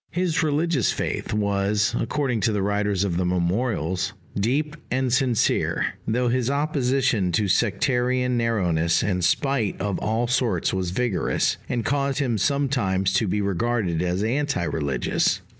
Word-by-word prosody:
His 175 -2 0
religious 155 -3 +1
faith - - -3
was, 100 0 +1
according 125 -1 -1
to 115 - +2
the 105 -2 -1
writers 100 -1 0
of 90 -4 -1
the 90 - +1
Memorials, 90 0 -1 0.2
deep 140 +9 0
and 130 -1 0
sincere, 125 -3 +1
though 120 +3 +1
his 125 0 +1
opposition 135 - +1
to 105 +4 +1
sectarian 125 +5 +1
narrowness 90 -9 +1
and 90 -3 -1
spite 135 - +1
of 100 0 -2
all 110 +3 0
sorts 120 -7 0
was 95 -2 -1
vigorous, 105 +1 0
and 120 -3 -1
caused 140 +2 0
him 125 -7 0
sometimes 105 -9 +1
to 100 +3 +2
be 105 +3 0
regarded 100 -3 0
as 90 +2 -1
anti 135 -3 0
religious. 70 -6 0
110 Hz, 140 wpm, -24 LUFS, 95-130 Hz, 0.2 s, to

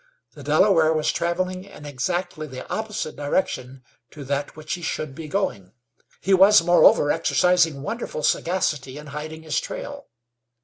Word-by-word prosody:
The - - -12
Delaware 165 -6 +4
was 155 -1 +1
traveling 185 +2 -2
in 195 -7 -13
exactly 155 +3 -3
the 130 -2 -9
opposite 215 -7 -4
direction 135 -3 -2 0.3
to 150 - -10
that 140 +1 -3
which 155 -1 -5
he 180 - -4
should 155 -3 -3
be 155 +2 -8
going. 105 - -3 0.5
He 195 - +1
was, 195 0 +7
moreover, 175 -4 +5
exercising 165 -1 +2
wonderful 225 -8 -4
sagacity 150 -7 0
in 150 - -9
hiding 155 +2 -7
his 155 - 0
trail. - - -7
160 Hz, 145 wpm, -23 LUFS, 145-180 Hz, 0.5 s, was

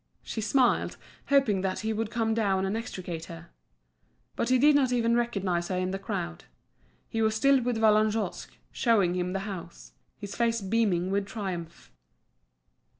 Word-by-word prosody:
She 220 - -4
smiled, 245 +4 +2 0.3
hoping 270 -9 +3
that 190 -1 -2
he 220 0 -1
would 220 0 -2
come 225 -1 0
down 195 -4 +1
and 195 +2 -1
extricate 180 -7 -5
her. 170 0 -11 0.8
But 235 - -1
he 255 - +5
did 295 +4 +5
not 265 -3 +3
even 235 -1 +2
recognise 195 -8 0
her 185 - -2
in 185 0 -1
the 195 - -3
crowd; 85 - -5 0.6
he 225 - -2
was 220 0 +2
still 275 +3 +4
with 245 -1 -1
Vallagnosc, 215 -2 +2 0.2
showing 210 -8 +2
him 180 0 -2
the 195 - -2
house, 185 -4 -8 0.2
his 205 -2 -7
face 230 -1 +1
beaming 195 -3 0
with 200 0 0
triumph. 180 -6 -6
210 Hz, 160 wpm, -28 LUFS, 185-230 Hz, 0.8 s, he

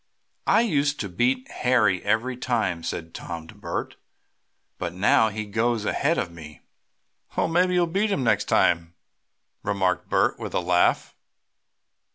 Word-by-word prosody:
"I - - +5
used 150 -9 +1
to 100 - -4
beat 125 +8 0
Harry 110 -7 +2
every 125 +3 0
time," 120 -9 -1
said 80 0 -5
Tom 85 -2 -7
to - - -13
Bert, - - -5 0.8
"but 85 0 -4
now 105 +4 +4
he 110 +1 -5
goes 110 +1 0
ahead 140 +10 +1
of 90 - -2
me." 80 -2 -12 0.8
"Well, - - +2
maybe 180 +2 +2
you'll 175 -1 +3
beat 195 +6 0
him 140 - 0
next 120 - +2
time," 85 0 +2 0.7
remarked 95 -3 -1
Bert, - - +2
with - - -5
a - - +3
laugh. 90 0 +2
110 Hz, 150 wpm, -25 LUFS, 90-130 Hz, 0.8 s, I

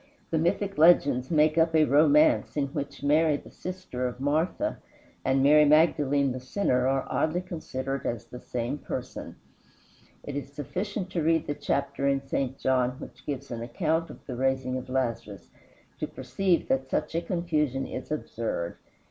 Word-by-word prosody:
The 160 - +2
mythic 195 +3 0
legends 145 -6 +5
make 155 0 +3
up 165 0 +3
a 155 -1 +6
romance 150 +1 +4
in 140 -1 0
which 140 -1 -5
Mary 150 +1 +3
the - - -14
sister 180 -9 -4
of 125 0 -7
Martha 160 - 0 0.4
and 135 0 +2
Mary 150 +2 +7
Magdalene 145 -3 +4
the 130 - -4
sinner 130 -2 0
are 135 0 +1
oddly 160 +3 0
considered 135 -7 -4
as 115 -3 -3
the 125 - -10
same 125 +4 -3
person. 130 0 -6 0.9
It 145 - -6
is 140 -1 -5
sufficient 185 - -4
to 175 - -1
read 160 0 +2
the 145 - -2
chapter 140 -1 -1
in 140 0 +2
St. 135 -1 -2
John 125 -1 +1
which - - -11
gives 140 -3 -4
an 115 -1 -4
account 160 +7 -1
of - - -12
the 125 - -5
raising 130 0 0
of 130 0 -5
Lazarus, 115 -7 -3 0.5
to - - -2
perceive 185 -3 0
that 130 0 0
such - - -1
a 165 - 0
confusion 155 -7 -1
is 130 - -7
absurd. 115 - -3
140 Hz, 165 wpm, -27 LUFS, 130-160 Hz, 0.9 s, Mary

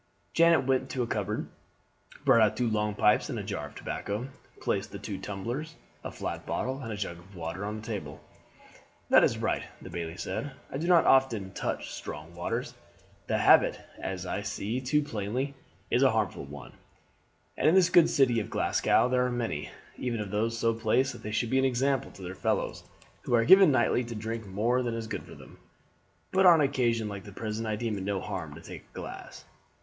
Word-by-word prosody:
Janet 170 -4 +5
went 130 -1 +1
to 125 - -1
a - - -1
cupboard, 115 - -2 0.8
brought 115 - +6
out 110 - +3
two 125 - +1
long 105 -1 0
pipes 105 0 +3
and - - -3
a - - -3
jar 75 +1 -4
of - - -16
tobacco, 105 +6 -4 0.3
placed - - -2
two 100 -3 -4
tumblers, 120 +12 -5 0.3
a - - -4
flat - - -5
bottle, 130 +2 -2
and 115 -3 -5
a 105 - -4
jug 85 -4 -4
of 95 +3 -17
water 85 +3 -5
on 105 +1 -3
the 110 0 -8
table. 75 -10 -5 0.9
"That - - +8
is - - +2
right," - - 0 0.2
the - - -10
bailie 85 0 -5
said. 95 +10 -4 0.2
"I 135 - -3
do 170 - -2
not 175 -2 +6
often 115 -8 +3
touch - - -3
strong 75 +3 -7
waters. 115 +8 -3 0.5
The - - +1
habit, - - +5 0.2
as 95 -1 -4
I 90 +3 -2
see 110 +3 -3
too 150 +4 +2
plainly, 125 +3 -3 0.4
is - - +3
a - - +6
harmful - - -1
one, 70 +1 -10 0.8
and - - +3
in 165 - +4
this 180 -2 +5
good 175 -2 +6
city 130 -6 +3
of 105 - -4
Glasgow 115 - +2
there 125 0 +2
are - - -2
many, 115 -12 -2 0.3
even 120 -3 -2
of 105 -2 -4
those 115 +2 0
so 115 -1 +2
placed 120 +4 +1
that 120 - -11
they 105 - -5
should 110 +2 -1
be 130 - +4
an 135 - +3
example 135 +1 +1
to 95 - -11
their 90 +1 -5
fellows, - - -1 0.4
who 120 - +1
are 115 -1 +3
given 190 +2 +8
nightly 130 -1 +2
to 115 0 -6
drink 110 0 -4
more 115 +6 +1
than 120 -2 -2
is 115 -1 -4
good 110 - -4
for - - -12
them; - - -15 0.7
but 190 0 +5
on 170 -2 +8
an 145 - +4
occasion 120 -5 0
like 100 -1 -6
the 105 - -10
present 110 +2 -4
I 110 - 0
deem 110 -2 -2
it - - -5
no 100 0 -1
harm 90 -8 -5
to 85 - -11
take - - -9
a - - -29
glass." - - -8
115 Hz, 210 wpm, -29 LUFS, 100-130 Hz, 0.9 s, That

